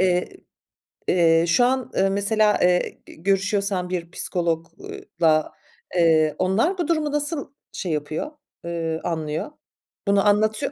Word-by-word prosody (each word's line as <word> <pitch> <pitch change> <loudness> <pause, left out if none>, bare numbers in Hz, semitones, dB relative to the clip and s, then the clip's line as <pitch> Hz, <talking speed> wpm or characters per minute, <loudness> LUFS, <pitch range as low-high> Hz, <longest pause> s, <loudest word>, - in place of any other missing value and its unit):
eee, 180 -1 +2 0.8
eee, 165 -2 +4
şu 205 +9 +4
an, 260 0 0
eee, 195 0 +3
mesela, 210 +2 +2
eee, 180 0 +2
g - - -13
görüşüyorsan 195 +1 0
bir 175 -2 -4
psikolog 165 -3 -2
ııı, 405 +1 -8 0.2
la, 155 -2 +3 0.4
eee, 160 -3 +4
onlar 210 - +1
bu 345 -4 -1
durumu 310 -3 0
nasıl 295 0 -3 0.2
şey 180 - -4
yapıyor, 155 - -3 0.3
eee, 165 -1 -2
anlıyor? 160 - -3 0.6
Bunu 200 +1 +3
anlatıyor 215 +6 +2
190 Hz, 135 wpm, -23 LUFS, 165-220 Hz, 0.8 s, eee